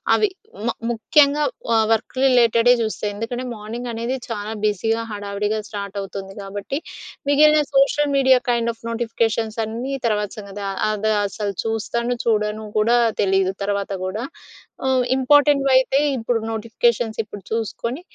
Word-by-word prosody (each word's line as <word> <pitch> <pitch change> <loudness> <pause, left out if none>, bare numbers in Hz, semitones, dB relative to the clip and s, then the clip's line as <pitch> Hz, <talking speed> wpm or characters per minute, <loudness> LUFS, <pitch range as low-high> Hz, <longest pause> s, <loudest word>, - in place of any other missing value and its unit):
అవి. 425 - +2 0.3
హ్మ్, 215 - -6
మ - - -2 0.2
ముఖ్యంగా 285 +5 +3 0.3
ఆహ్, 220 -1 +4
వర్క్ 225 +3 -3
రిలేటెడే 245 -1 +5
చూస్తా. 215 - -4
ఎందుకంటే 245 +4 -4
మార్నింగనేది 235 +3 -4
చాలా 215 -1 -4 0.2
బిజీగా 225 +3 0
హడావిడిగా 205 +1 -2
స్టార్ట్ 200 -1 -6
అవుతుంది 195 0 -8
కాబట్టి, 200 +8 -4 0.5
మిగిలిన 300 +1 +5
social 280 +1 +3
media 260 -2 +5
kind 235 -1 +1
of 230 - -30
notifications 225 -1 -1
అన్నీ 245 +5 -4
తర్వాత 210 -2 0
సంగతి. 200 0 -8
ఆహ్, 195 - -5
అది 215 +1 0
అసలు 200 0 -3
చూస్తాను, 225 -1 -2 0.4
చూడను 215 -1 0
కూడా 230 +3 +4 0.2
తెలీదు 190 -1 +2
తర్వాత 200 0 -1
కూడా? 210 +5 -3 0.6
హ్మ్. 260 -1 +2
ఇంపార్టెం‌ట్వైతే 275 -1 +4 0.2
ఇప్పుడు 230 0 0
నోటిఫికేషన్స్ 225 0 0
ఇప్పుడు 205 -1 -10
చూసుకొని 230 +5 -3
225 Hz, 130 wpm, -21 LUFS, 210-250 Hz, 0.6 s, రిలేటెడే